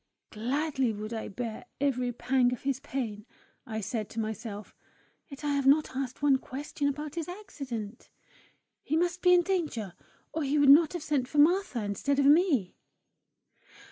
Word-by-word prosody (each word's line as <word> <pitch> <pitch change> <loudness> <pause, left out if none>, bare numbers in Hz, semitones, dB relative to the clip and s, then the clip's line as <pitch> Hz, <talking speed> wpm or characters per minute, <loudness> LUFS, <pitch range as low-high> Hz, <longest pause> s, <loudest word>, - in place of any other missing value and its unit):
"Gladly 265 +3 0
would 215 +1 -6
I 220 - -4
bear 225 +1 -6
every 255 -3 0
pang 250 +1 +2
of 245 - -7
his 270 -1 -1
pain," 230 -6 -5 0.4
I 220 -1 -3
said 215 0 -3
to 225 - -5
myself; 215 -1 -5 0.5
"yet 275 0 -11
I 290 -1 0
have 280 -1 +1
not 290 -1 +4
asked 265 +1 -4
one 275 -2 +4
question 285 +2 -4
about 295 +1 -3
his 335 0 -4
accident! 265 - -7 0.7
He 310 - -1
must 350 +1 0
be 360 - +5
in 355 -1 +6
danger, 310 - -2 0.4
or 320 - -2
he 285 +1 0
would 285 -1 +5
not 305 +3 +7
have 350 -4 -4
sent 280 -5 0
for 295 - -6
Martha 315 - +3
instead 205 +8 -1
of 280 - +3
me!" 290 - +3
275 Hz, 170 wpm, -29 LUFS, 230-300 Hz, 0.7 s, not